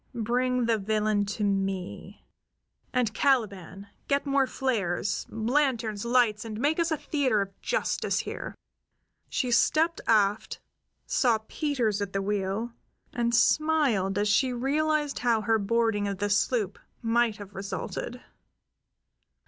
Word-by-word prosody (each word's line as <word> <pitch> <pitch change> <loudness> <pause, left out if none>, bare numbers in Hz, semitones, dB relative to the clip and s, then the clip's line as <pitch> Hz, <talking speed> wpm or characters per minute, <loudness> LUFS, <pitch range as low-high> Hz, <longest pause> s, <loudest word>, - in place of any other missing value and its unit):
Bring 250 +2 0
the 225 -1 +2
villain 210 0 +1
to 205 +1 -3
me. 195 -2 -3 0.7
And, 245 -4 0
Caliban, 200 -8 0 0.2
get 280 0 +1
more 275 -1 +2
flares, 205 -9 -1
lanterns, 230 -2 0
lights, 235 -3 +2
and 220 -1 -6
make 295 +6 +1
us 335 0 +2
a 315 - 0
theater 270 -9 0
of 195 -1 -5
justice - - 0
here." - - -6 0.7
She 250 -2 -1
stepped 320 +7 +2
aft, 210 -1 +2 0.5
saw 240 -4 +2
Peters 245 -9 -1
at 200 -1 -4
the 195 - 0
wheel, 205 +3 -2 0.4
and 235 -1 +1
smiled 250 -8 +2
as 205 +1 +1
she 230 +6 +3
realized 295 +4 0
how 235 -3 +2
her 225 +1 +2
boarding 220 0 +1
of 200 -1 -3
the 205 +1 -1
sloop 210 -1 +1 0.2
might 230 -1 +2
have 205 -2 -10
resulted. 200 +5 -5
225 Hz, 130 wpm, -27 LUFS, 205-255 Hz, 0.7 s, she